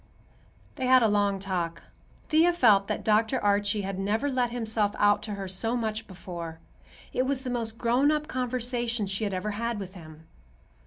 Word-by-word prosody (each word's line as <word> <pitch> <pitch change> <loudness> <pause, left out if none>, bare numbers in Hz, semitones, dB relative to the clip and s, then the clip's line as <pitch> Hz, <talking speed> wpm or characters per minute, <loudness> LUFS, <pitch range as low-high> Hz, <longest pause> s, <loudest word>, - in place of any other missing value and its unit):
They 260 -2 -1
had 255 -1 +6
a - - +5
long 205 -1 +2
talk. 180 -4 -3 0.5
Thea 330 +3 +4
felt 210 - +4
that - - -3
Dr. 220 +4 +2
Archie 205 +1 +2
had 195 0 -4
never 220 +8 0
let 250 -2 +1
himself 220 -3 0
out 205 0 +4
to 210 -1 -5
her 195 -1 -5
so 225 +6 0
much 220 -1 -3
before. 170 -3 -7 0.6
It 255 - +1
was 270 -1 +1
the 255 - -3
most 230 -2 -3
grown 245 +5 +2
up 300 0 0
conversation 245 -3 -1
she 195 +3 -2
had 200 - -2
ever 210 +3 -2
had 230 +2 -2
with 190 -2 -7
him. 160 -3 -13
220 Hz, 180 wpm, -27 LUFS, 195-245 Hz, 0.6 s, had